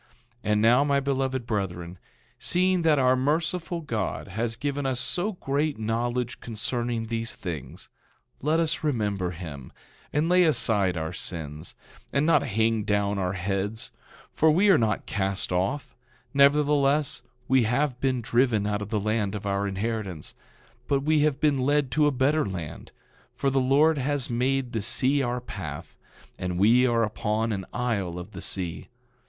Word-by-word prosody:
10:20 120 Hz, -, -32 dB, 0.4 s
And 105 Hz, 0 st, +3 dB
now, 120 Hz, +5 st, +5 dB
my 140 Hz, -1 st, +2 dB
beloved 135 Hz, -2 st, -1 dB
brethren, 90 Hz, -5 st, -3 dB, 0.4 s
seeing 185 Hz, 0 st, +2 dB
that 160 Hz, -2 st, +4 dB
our 130 Hz, -1 st, +4 dB
merciful 165 Hz, +5 st, -1 dB
God 110 Hz, -, -3 dB
has 115 Hz, +3 st, -2 dB
given 145 Hz, +1 st, -2 dB
us 130 Hz, -2 st, -1 dB
so 180 Hz, +10 st, -1 dB
great 145 Hz, -2 st, -1 dB
knowledge 120 Hz, +3 st, -2 dB
concerning 120 Hz, +1 st, -3 dB
these 115 Hz, 0 st, -3 dB
things, 85 Hz, -7 st, -7 dB, 0.5 s
let 155 Hz, +4 st, +2 dB
us 160 Hz, -1 st, 0 dB
remember 105 Hz, -, 0 dB
him, 80 Hz, -7 st, -8 dB, 0.4 s
and 150 Hz, +2 st, +1 dB
lay 180 Hz, +1 st, +5 dB
aside 110 Hz, -, +2 dB
our 80 Hz, +2 st, -3 dB
sins, 80 Hz, -3 st, -6 dB, 0.4 s
and 140 Hz, +2 st, +1 dB
not 165 Hz, -, +4 dB
hang 110 Hz, -3 st, +1 dB
down 100 Hz, -1 st, 0 dB
our 90 Hz, -1 st, -1 dB
heads, 100 Hz, +3 st, -3 dB, 0.4 s
for 160 Hz, -, +4 dB
we 185 Hz, +7 st, +4 dB
are 180 Hz, -, +6 dB
not 110 Hz, -3 st, 0 dB
cast 95 Hz, -2 st, -2 dB
off; 95 Hz, +11 st, -1 dB, 0.4 s
nevertheless, 145 Hz, 0 st, +3 dB, 0.3 s
we 130 Hz, 0 st, +4 dB
have 125 Hz, +2 st, 0 dB
been 130 Hz, -2 st, +1 dB
driven 120 Hz, -3 st, +2 dB
out 105 Hz, 0 st, -1 dB
of 105 Hz, -, -5 dB
the 110 Hz, -1 st, 0 dB
land 105 Hz, -1 st, -1 dB
of 105 Hz, 0 st, -6 dB
our 100 Hz, 0 st, 0 dB
inheritance; 100 Hz, -4 st, -4 dB, 0.5 s
but 140 Hz, -1 st, +2 dB
we 155 Hz, +1 st, +3 dB
have 145 Hz, -2 st, +2 dB
been 145 Hz, -3 st, +2 dB
led 145 Hz, 0 st, +1 dB
to 150 Hz, -1 st, +3 dB
a -, -, +3 dB
better 145 Hz, +4 st, +2 dB
land, 90 Hz, -6 st, -6 dB, 0.4 s
for 135 Hz, -, 0 dB
the 135 Hz, 0 st, +2 dB
Lord 145 Hz, +4 st, +4 dB
has 140 Hz, -1 st, -1 dB
made 130 Hz, +1 st, 0 dB
the 110 Hz, -, -2 dB
sea 135 Hz, +7 st, +2 dB
our 125 Hz, -1 st, -1 dB
path, 85 Hz, -11 st, -7 dB, 0.4 s
and 90 Hz, -1 st, -2 dB
we 120 Hz, +6 st, +5 dB
are 115 Hz, -1 st, +2 dB
upon 110 Hz, +1 st, -1 dB
an 95 Hz, -3 st, -3 dB
isle 100 Hz, -8 st, -2 dB
of 90 Hz, +4 st, -8 dB
the 95 Hz, -, -8 dB
sea. 90 Hz, -4 st, -4 dB
120 Hz, 165 wpm, -26 LUFS, 100-140 Hz, 0.5 s, are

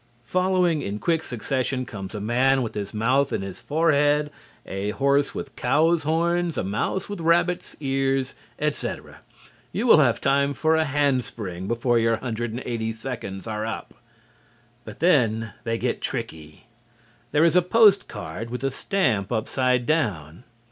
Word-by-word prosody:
Following 180 Hz, +1 st, +1 dB
in 100 Hz, -3 st, -3 dB
quick 165 Hz, +7 st, 0 dB
succession 130 Hz, 0 st, -2 dB
come 95 Hz, -5 st, -7 dB
a -, -, -3 dB
man 125 Hz, +5 st, +2 dB
with 115 Hz, -, -5 dB
his 105 Hz, -1 st, -4 dB
mouth 125 Hz, +6 st, +1 dB
in -, -, -2 dB
his 95 Hz, -1 st, -8 dB
forehead, 150 Hz, -1 st, +2 dB, 0.3 s
a 95 Hz, +2 st, -3 dB
horse 140 Hz, +5 st, +1 dB
with 135 Hz, -4 st, -6 dB
cow's 160 Hz, +6 st, +2 dB
horns, 170 Hz, +2 st, 0 dB
a -, -, 0 dB
mouse 105 Hz, -, -2 dB
with 205 Hz, -4 st, -6 dB
rabbit's 170 Hz, +2 st, +1 dB
ears, 135 Hz, -1 st, 0 dB, 0.2 s
etc. 150 Hz, 0 st, -4 dB, 0.5 s
You -, -, -2 dB
will -, -, +7 dB
have -, -, +3 dB
time 140 Hz, +1 st, +2 dB
for 160 Hz, 0 st, +2 dB
a 160 Hz, 0 st, +2 dB
handspring 125 Hz, -, -1 dB
before 120 Hz, +1 st, +1 dB
your 115 Hz, 0 st, +2 dB
180 115 Hz, -1 st, -3 dB
seconds 110 Hz, -5 st, -6 dB
are 110 Hz, -1 st, -3 dB
up. 110 Hz, 0 st, -5 dB, 0.9 s
But 110 Hz, +3 st, -10 dB
then 115 Hz, -, +2 dB
they 115 Hz, 0 st, 0 dB
get -, -, -2 dB
tricky. 75 Hz, +2 st, -6 dB, 0.7 s
There 150 Hz, +2 st, +4 dB
is 170 Hz, -, +3 dB
a 180 Hz, -, +6 dB
post 200 Hz, +2 st, +5 dB
card 90 Hz, +8 st, -7 dB
with 125 Hz, +2 st, -5 dB
a 135 Hz, -, 0 dB
stamp 125 Hz, -, 0 dB
upside 125 Hz, +2 st, 0 dB
down. 100 Hz, -, -1 dB
130 Hz, 150 wpm, -24 LUFS, 110-155 Hz, 0.9 s, will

